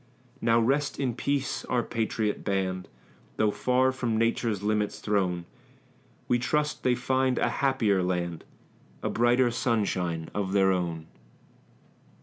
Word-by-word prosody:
Now 115 0 +4
rest 135 +5 +1
in 130 -3 0
peace, 140 +2 -1
our 125 -2 0
patriot 110 -2 -2
band; 95 -2 -1 0.5
Though 110 -1 +3
far 130 +3 +2
from 120 -4 -1
Nature's 115 -2 0
limits 105 0 0
thrown, 90 -4 0 0.8
We 120 - +2
trust 150 +4 0
they 125 -1 +2
find 130 +1 +1
a - - +2
happier 115 -8 +2
land, 90 -2 -2 0.6
A - - -1
brighter 120 +1 +3
sunshine 90 -9 -1
of 100 -2 -2
their 95 -1 +4
own. 85 -3 -2
110 Hz, 130 wpm, -27 LUFS, 95-125 Hz, 0.8 s, Now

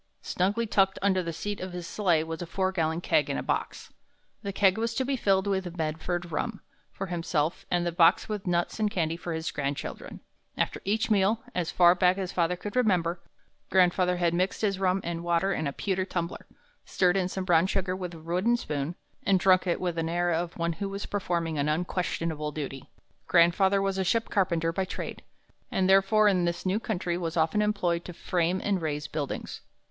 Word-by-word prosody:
Snugly 205 +6 0
tucked 195 -3 +2
under 190 -2 +3
the 170 -1 -4
seat 205 +5 -4
of 185 -1 -6
his 175 -1 -5
sleigh 175 -5 +1
was 160 +1 -6
a 175 - -5
four 190 +2 0
gallon 165 -2 -1
keg 150 -4 +2
and 140 - -1
a - - -3
box. - - -3 0.5
The 200 - -4
keg 195 +1 +3
was 230 0 -1
to 260 - 0
be 275 +1 0
filled 195 -5 +2
with 190 -3 -2
Medford 165 +2 -2
rum 220 - -2 0.3
for 195 - -5
himself, 165 -3 -2
and 175 -1 +1
the 175 - 0
box 165 -1 +4
with 210 -3 -4
nuts 175 +4 0
and 215 -1 +2
candy 165 -4 -1
for 175 0 -6
his 160 +1 -3
grandchildren. 140 -1 -4 0.4
After - - -1
each 215 +3 0
meal, 210 +2 +2
as 175 -3 -1
far 175 -1 +6
back 180 +1 +3
as 190 -2 -3
father 175 -1 +1
could 205 +5 -7
remember, 180 -8 +1 0.5
grandfather 180 -1 +3
had 170 -1 +1
mixed 185 +2 0
his 200 -3 0
rum 190 0 +1
and 170 0 -4
water 175 +3 +1
in 155 - -2
a - - -1
pewter 190 +5 -1
tumbler, 175 -2 -4 0.4
stirred 180 -1 +2
in 190 -2 +1
some 185 0 -4
brown 175 -1 +4
sugar 190 -1 -1
with 180 -2 -5
a - - -10
wooden 180 +9 +1
spoon, 150 -4 -3 0.3
and 195 -2 +3
drunk 185 0 +4
it 175 - +1
with 180 -2 -1
the 165 0 -1
air 175 0 +1
of 170 +1 -2
one 170 0 0
who 200 +4 -4
was 200 +1 -5
performing 170 -6 -2
an 145 +1 +1
unquestionable 160 -2 -2
duty. 135 -3 -6 0.4
"Grandfather 190 +3 +4
was 195 -1 -1
a - - +2
ship 225 +5 +1
carpenter 170 -4 +1
by 190 - 0
trade, 190 - -6 0.5
and 185 -1 +1
therefore 195 +3 +5
in 185 -3 +3
this 170 +2 -2
new 190 +3 +1
country 175 -6 -2
was 165 -1 -3
often 160 +6 +2
employed 175 -5 0
to 180 - -8
frame 175 +1 0
and 195 -3 0
raise 150 -2 -2
buildings. 150 -2 -4
180 Hz, 205 wpm, -28 LUFS, 170-195 Hz, 0.5 s, far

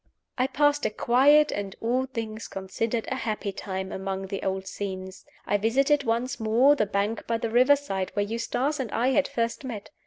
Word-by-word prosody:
I 255 +1 +1
passed 290 +1 +2
a - - -2
quiet 280 +7 +4
and 200 -1 -4
(all 250 +3 0
things 225 -4 -5
considered) 220 +4 -3
a 260 - -1
happy 215 -4 -3
time 190 -1 -5
among 195 0 -4
the 195 0 -5
old 190 0 -2
scenes. 190 -1 -6 0.2
I 205 - +2
visited 275 +7 +2
once 235 +2 -1
more 235 +6 +4
the 215 -7 0
bank 205 +3 -2
by 230 - +1
the 230 0 -3
river 255 +5 +6
side, 195 -10 -3
where 205 -1 +1
Eustace 240 +7 -1
and 250 -5 -3
I 240 +3 +2
had 280 +1 +2
first 230 +3 -2
met. 230 -4 -7
230 Hz, 190 wpm, -26 LUFS, 200-260 Hz, 0.2 s, river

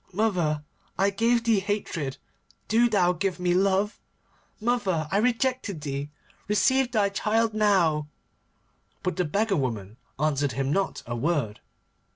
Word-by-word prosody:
Mother, 175 -7 0 0.3
I 195 +1 +3
gave 230 +3 +2
thee 225 -3 +3
hatred. 190 -8 -3 0.5
Do 235 +2 +4
thou 180 -5 +3
give 185 0 -2
me 180 -1 +1
love. 195 +3 +1 0.6
Mother, 200 -9 0
I 195 - +2
rejected 245 - 0
thee. 140 0 -4 0.4
Receive 260 +5 +2
thy 210 -4 +2
child 220 +3 +1
now.' 185 -8 +2 1.0
But 185 - -2
the 180 - +1
beggar 200 +5 +1
woman 110 -6 -3 0.2
answered 145 -2 0
him 135 +3 -1
not 195 0 -1
a 120 - -4
word. 125 -5 -1
190 Hz, 135 wpm, -26 LUFS, 150-215 Hz, 1.0 s, Do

